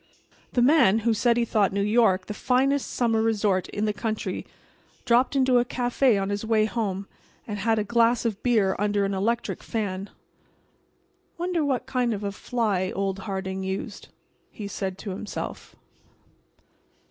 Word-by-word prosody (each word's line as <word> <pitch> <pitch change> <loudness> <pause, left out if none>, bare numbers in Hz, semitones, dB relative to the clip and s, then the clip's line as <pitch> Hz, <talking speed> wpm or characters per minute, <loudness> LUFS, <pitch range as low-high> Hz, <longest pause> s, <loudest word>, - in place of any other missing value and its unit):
The 245 - +3
man 245 -7 +5
who 230 - +4
said 235 +2 +2
he 235 - +2
thought 210 -4 +2
New 200 +1 0
York 210 -4 +3
the 210 - -5
finest 270 +5 +1
summer 225 -2 +1
resort 210 -4 +1
in 210 - -2
the 210 - 0
country 220 0 -3 0.6
dropped 250 +3 +3
into 260 -2 +4
a - - +3
café 245 -2 +1
on 195 +1 -2
his 205 +1 -2
way 220 -1 +2
home 200 -4 -3 0.4
and 205 -2 -5
had 225 +2 +1
a 215 - +1
glass 235 +2 +2
of 215 -3 -2
beer 215 -6 +2
under 205 -1 +1
an 195 - -2
electric 230 +5 -1
fan. 200 -3 -3 1.3
"Wonder 345 -1 -1
what 265 -3 0
kind 250 -3 0
of 205 - -6
a 200 - -2
fly 200 -4 -1
old 195 0 -1
Harding 190 0 -3
used," 190 +2 -5 0.4
he 210 - -7
said 190 -2 -4
to 200 0 -6
himself. 200 +3 -6
220 Hz, 160 wpm, -25 LUFS, 200-240 Hz, 1.3 s, man